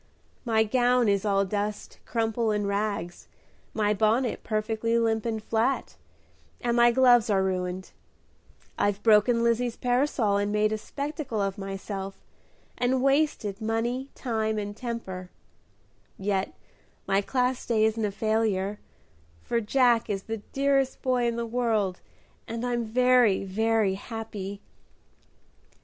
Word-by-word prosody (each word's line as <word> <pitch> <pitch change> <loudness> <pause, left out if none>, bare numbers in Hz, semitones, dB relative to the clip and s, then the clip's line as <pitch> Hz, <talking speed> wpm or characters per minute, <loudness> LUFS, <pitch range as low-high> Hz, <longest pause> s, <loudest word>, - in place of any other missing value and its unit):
"My 220 -2 +3
gown 245 +1 +2
is 200 0 +1
all 200 -1 +2
dust, 205 +1 -4
crumple, 225 0 0
and 210 -1 0
rags, 200 -4 -3 0.4
my 210 -1 +1
bonnet 220 +4 +1
perfectly 220 +1 0
limp 225 -1 +1
and 220 -2 -3
flat, 230 +5 0 0.6
and 240 -1 0
my 240 0 +6
gloves 245 -2 +5
are 195 -2 +3
ruined; 185 0 -3 0.9
I've 205 0 0
broken 230 +2 +4
Lizzie's 235 0 +1
parasol, 245 -5 +1
made 210 +1 +1
a 215 - 0
spectacle 280 -2 -4
of 195 0 -1
myself, 195 0 -5 0.6
and 255 +1 +1
wasted 275 -8 +1
money, 235 +4 -1
time, 220 -3 -1
and 205 0 -4
temper; 200 -7 -6 0.9
yet 195 -1 -1 0.5
my 195 +1 +2
Class 250 +3 0
Day 220 -2 +2
isn't 220 0 0
a 210 - +1
failure, 210 -1 0 0.6
for 235 - 0
Jack 240 +1 +3
is 195 -2 -2
the 225 0 -4
dearest 275 +4 0
boy 250 -2 +2
in 235 - -1
the 235 0 -2
world, 225 -6 0 0.5
and 230 +2 -4
I'm 240 -1 0
very, 245 -3 +3
very 215 +1 +1
happy!" 205 -1 -6
220 Hz, 130 wpm, -27 LUFS, 205-240 Hz, 0.9 s, my